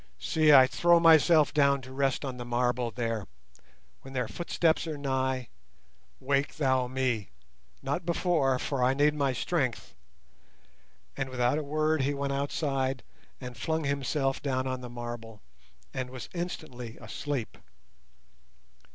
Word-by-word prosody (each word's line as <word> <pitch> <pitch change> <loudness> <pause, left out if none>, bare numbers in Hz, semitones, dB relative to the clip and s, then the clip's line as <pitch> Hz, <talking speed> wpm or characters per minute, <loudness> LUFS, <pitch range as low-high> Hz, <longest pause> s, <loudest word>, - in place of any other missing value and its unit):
See, 155 - +3
I 135 -3 +9
throw 170 +5 +4
myself 160 -1 +5
down 140 -1 +4
to 130 - -10
rest 135 +1 0
on 130 -2 -5
the 120 - -5
marble 120 0 0
there; 115 -3 -3 0.7
when 135 0 -11
their 125 -3 0
footsteps 165 +7 0
are 155 -2 -4
nigh, 130 -3 -1 0.7
wake 140 +1 0
thou 130 -4 +1
me, 125 -5 -1 0.5
not 175 - -2
before, 165 -6 +1
for 130 0 -2
I 130 +2 +3
need 145 +1 +3
my 140 -3 +1
strength," 130 -1 -2 1.2
and 135 -1 -3
without 125 +3 +1
a - - -4
word 155 +1 +1
he 140 +2 0
went 140 0 -2
outside 135 -2 -1 0.4
and 125 -2 -8
flung 160 +7 -2
himself 140 -1 -1
down 130 -2 -1
on 130 -1 -3
the 125 - -7
marble, 120 -2 -7 0.5
and 130 -1 -3
was 130 -1 -8
instantly 155 -9 -6
asleep. 120 +2 -5
135 Hz, 140 wpm, -29 LUFS, 125-145 Hz, 1.2 s, I